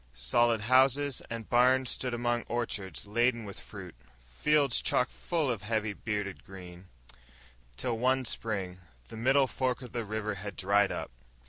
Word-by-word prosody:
Solid 110 - +2
houses 130 +3 +3
and 115 -2 -5
barns 125 +1 +4
stood 125 - -2
among 120 0 0
orchards 105 -7 -3
laden 115 +2 +1
with 100 - -7
fruit, 95 -4 -10 0.4
fields 140 - +3
chock 125 - +2
full 160 -6 -1
of 110 -5 -3
heavy 110 0 -1
bearded 105 -3 -4
grain... 90 -1 -11 0.9
till, 115 - -2
one 130 +1 +2
Spring, 95 -6 -3 0.3
the - - -9
middle 135 +4 +4
fork 130 0 -2
of 125 - -9
the 120 - -2
river 105 0 -3
had 100 +1 -7
dried 100 +1 +3
up. - - -4
115 Hz, 150 wpm, -30 LUFS, 100-125 Hz, 0.9 s, barns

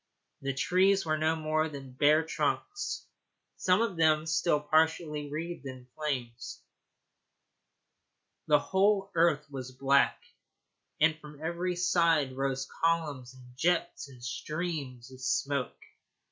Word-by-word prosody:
The 135 -1 -2
trees 185 +7 +3
were 155 -1 0
no 160 +1 +2
more 155 0 0
than 135 -3 -9
bare 150 +4 +4
trunks, 165 - -2 0.5
some 185 +4 +3
of 200 -7 -3
them 155 -1 +3
still 160 -1 +2
partially 155 -1 +1
wreathed 160 0 -5
in 130 -1 -9
flames. 125 -6 -4 1.8
The 150 - +6
whole 195 +5 +1
earth 165 -3 +3
was 130 -2 -6
black, 140 +1 +3 0.8
and 155 0 +3
from 150 -1 -12
every 170 +3 -2
side 170 -6 +2
rose 135 0 -1 0.2
columns 150 -7 0
and 125 -1 -16
jets 175 +1 0
and 125 -3 -14
streams 135 -1 -4
of 130 0 -12
smoke. 130 0 -1
155 Hz, 120 wpm, -30 LUFS, 135-170 Hz, 1.8 s, The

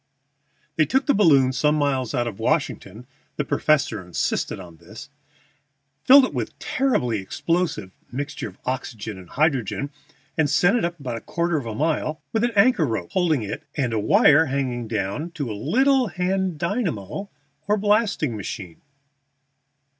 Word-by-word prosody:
They 155 - +3
took 265 +1 +1
the 285 - +3
balloon 140 -10 +4
some 150 +3 +2
miles 135 -5 0
out 120 - +1
of 110 -5 -6
Washington 110 +6 -2 0.3
(the 150 - -2
professor 140 -12 +1
insisted 90 +1 -2
on 85 -3 -11
this), 100 - -12 1.0
filled 270 +1 +8
it - - -6
with - - -2
a - - -34
terribly 125 - 0
explosive 155 - -2 0.2
mixture 140 +1 -4
of 95 - -18
oxygen 115 -5 -4
and 90 -2 -14
hydrogen, 140 -2 0 0.5
and 150 -2 +3
sent 180 - +3
it 235 - +1
up 170 -1 -4
about 125 -4 -4
a - - -8
quarter 170 0 -1
of 130 -6 -4
a 110 - -4
mile, 155 +1 -1
with 225 0 +1
an 240 - +3
anchor 200 - +4
rope 110 -7 -3
holding 160 -9 +1
it 100 - -5 0.2
and 125 -5 0
a 110 - +1
wire 150 +9 +5
hanging 130 -4 -2
down 110 - -2
to 140 -9 -4
a - - -3
little 255 - +2
hand 185 -2 -1
dynamo 175 - -3 0.4
or 210 +1 +2
blasting 205 - +1
machine. 95 -4 -7
145 Hz, 160 wpm, -23 LUFS, 115-180 Hz, 1.0 s, filled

